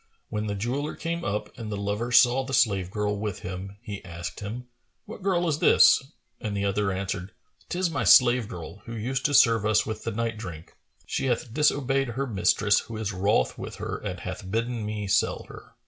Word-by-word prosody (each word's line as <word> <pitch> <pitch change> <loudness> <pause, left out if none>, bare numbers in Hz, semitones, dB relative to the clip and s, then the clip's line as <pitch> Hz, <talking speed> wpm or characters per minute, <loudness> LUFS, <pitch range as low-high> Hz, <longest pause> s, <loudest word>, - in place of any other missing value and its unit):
When 105 0 -2
the 100 - -2
jeweller 125 +9 -2
came 170 +1 -3
up 105 +2 -3
and 110 -2 -5
the 105 - -2
lover 105 +4 -2
saw 125 +2 +5
the 135 +1 -2
slave 100 -8 +2
girl 105 +1 -1
with 105 -2 -4
him, 95 +2 -6
he 105 -4 -7
asked 85 -2 -7
him, 110 +5 -6 0.4
"What 215 -1 -9
girl 180 -2 +1
is 155 -2 0
this?"; - - +6 0.4
and 105 -4 -3
the 100 - 0
other 100 0 +1
answered, 95 0 -4 0.4
"'Tis 180 -1 0
my - - -1
slave 120 -3 +6
girl 90 +1 -8
who 115 - -6
used 125 +4 -2
to 145 - +2
serve 115 -4 +5
us 110 0 +3
with 110 0 -5
the 115 - -2
night 115 0 -2
drink; 85 -6 -9 0.3
she - - -2
hath 120 -2 -1
disobeyed 135 -2 +2
her 125 +4 -2
mistress 105 -1 +2
who 115 -1 -7
is 105 -2 -3
wroth 100 +3 +1
with - - -6
her - - -4
and - - -5
hath 95 - -6
bidden 115 +1 -2
me 105 -1 -3
sell 95 - +1
her." - - -13
110 Hz, 205 wpm, -26 LUFS, 100-125 Hz, 0.4 s, this